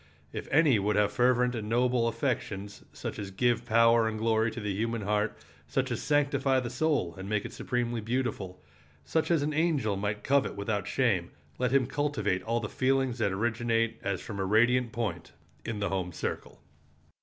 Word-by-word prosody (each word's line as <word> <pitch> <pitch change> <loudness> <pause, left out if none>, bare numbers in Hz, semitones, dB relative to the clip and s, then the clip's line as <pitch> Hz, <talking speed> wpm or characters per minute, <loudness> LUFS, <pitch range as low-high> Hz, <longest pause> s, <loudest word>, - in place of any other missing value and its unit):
If - - -5
any 145 -6 +4
would 105 +2 0
have 105 -1 +3
fervent 125 0 +3
and 110 -3 -4
noble 120 0 +2
affections, 115 -5 -3
such - - -6
as 100 -2 -5
give 120 +4 0
power 115 0 +5
and 110 -1 -2
glory 110 0 +2
to 115 - -7
the 105 -2 -2
human 115 +2 -2
heart, 105 +1 0 0.3
such - - -1
as - - -2
sanctify 140 -2 +2
the 120 -2 -4
soul 130 - 0
and 95 +1 -6
make 105 -2 0
it - - -7
supremely 120 -2 -2
beautiful, 110 -6 -3 0.4
such 160 - 0
as 165 -4 +3
an 150 +1 -1
angel 145 -10 +1
might 105 +1 -2
covet 140 0 +2
without 100 0 -2
shame, 105 -10 +1 0.3
let 125 0 +2
him 135 -2 +4
cultivate 130 -8 -1
all 115 +4 -1
the 110 - -4
feelings 130 0 0
that 100 - +1
originate, 115 +2 0
as 100 -2 -2
from 100 -2 -7
a - - 0
radiant 120 +4 +3
point, 105 -8 -4 0.3
in 115 - -3
the 100 0 -1
home 95 -2 -2
circle. - - -5
115 Hz, 185 wpm, -29 LUFS, 105-125 Hz, 0.4 s, power